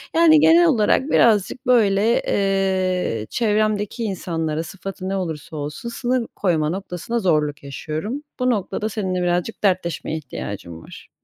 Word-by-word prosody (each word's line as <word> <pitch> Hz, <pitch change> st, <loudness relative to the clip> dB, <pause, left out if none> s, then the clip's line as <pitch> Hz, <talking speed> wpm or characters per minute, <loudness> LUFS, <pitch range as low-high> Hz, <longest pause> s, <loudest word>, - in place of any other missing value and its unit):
Yani, 325 Hz, -2 st, +6 dB
genel 335 Hz, +3 st, +6 dB
olarak 260 Hz, 0 st, +2 dB
birazcık, 225 Hz, +3 st, +3 dB
böyle, 220 Hz, -2 st, +3 dB
eee, 185 Hz, -, 0 dB
çevremdeki 215 Hz, 0 st, 0 dB
insanlara, 165 Hz, -6 st, -2 dB
sıfatı 190 Hz, +2 st, -7 dB
ne 195 Hz, -, -1 dB
olursa 160 Hz, -4 st, -5 dB
olsun, 150 Hz, +11 st, -5 dB
sınır 245 Hz, 0 st, -1 dB
koyma 160 Hz, -6 st, +1 dB
noktasında 190 Hz, +5 st, -3 dB
zorluk 150 Hz, -7 st, 0 dB
yaşıyorum. 155 Hz, -, -5 dB, 0.2 s
Bu 255 Hz, 0 st, +2 dB
noktada 215 Hz, -1 st, -1 dB
seninle 190 Hz, -4 st, -2 dB
birazcık 175 Hz, +5 st, -1 dB
dertleşmeye 180 Hz, -4 st, 0 dB
ihtiyacım 100 Hz, -, -7 dB
var. -, -, -13 dB
195 Hz, 130 wpm, -21 LUFS, 165-225 Hz, 0.2 s, Yani